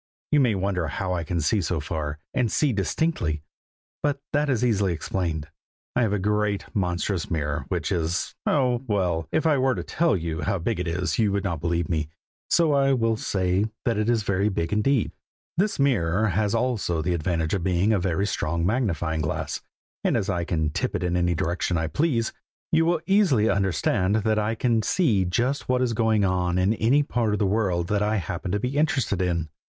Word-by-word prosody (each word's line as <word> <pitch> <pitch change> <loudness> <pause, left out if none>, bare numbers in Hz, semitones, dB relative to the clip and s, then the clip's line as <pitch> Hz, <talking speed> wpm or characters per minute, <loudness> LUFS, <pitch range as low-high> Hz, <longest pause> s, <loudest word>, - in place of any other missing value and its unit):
You 150 - +5
may 125 -6 +3
wonder 95 -3 -1
how 90 +5 -2
I 85 -2 -1
can 85 +2 -2
see 95 +7 +2
so 85 -1 -1
far, 75 0 -3 0.2
and 125 -5 +1
see 145 +2 +2
distinctly, 95 - -1 0.6
but 145 -1 0
that 145 0 +2
is 125 -2 +1
easily 100 -6 +2
explained. 80 -2 -3 0.5
I 125 - +3
have 110 -4 +2
a 105 - +1
great, 105 0 0
monstrous 90 -1 -1
mirror, 75 -2 -2
which 85 -5 -2
is 85 -1 -1
oh! 125 -4 +2
well, 90 -6 0
if 160 +1 +1
I 150 -4 +3
were 130 0 +2
to - - -4
tell 165 - +1
you 80 -2 -3
how 100 -1 0
big 95 +4 -2
it 90 - -2
is, 90 +5 -1
you 105 -3 +3
would 100 -1 -1
not 85 -6 -2
believe 85 -1 0
me, 80 -3 -1 0.4
so 165 -3 +3
I 135 -1 +3
will 115 -3 +1
only 110 - -2
say 95 +1 +1 0.2
that 115 -3 +1
it 110 +2 +1
is 115 -2 +2
very 100 0 +1
big 85 -3 -2
indeed. 110 +3 +2 0.4
This 200 +5 +1
mirror 110 -7 +2
has 105 +3 +1
also 115 -9 0
the 90 +2 0
advantage 80 -1 -1
of 95 -4 -1
being 95 +4 +2
a 105 - +2
very 95 +1 0
strong 85 -4 -1
magnifying 85 - 0
glass, 75 - -3 0.4
and - - +2
as 100 - -1
I 85 -2 -1
can 80 -3 0
tip - - -2
it - - -2
in 90 0 0
any 90 0 +1
direction 85 0 -1
I 80 - 0
please, 120 - 0 0.4
you 165 0 +4
will 170 -2 +1
easily 170 - +3
understand 95 +1 +1
that 110 0 +1
I 105 +2 0
can 115 -1 +1
see 110 - +2
just 120 +11 -1
what 125 0 +3
is 120 -2 0
going 110 -2 +2
on 90 -1 0
in 95 +4 +3
any 125 +7 +3
part 115 -6 0
of - - +1
the 105 - +1
world 95 -4 0
that 105 -1 +1
I 105 +1 +1
happen 95 -1 -3
to 105 - 0
be 125 +6 -2
interested 135 - +1
in. 85 -3 -1
100 Hz, 210 wpm, -25 LUFS, 85-115 Hz, 0.6 s, You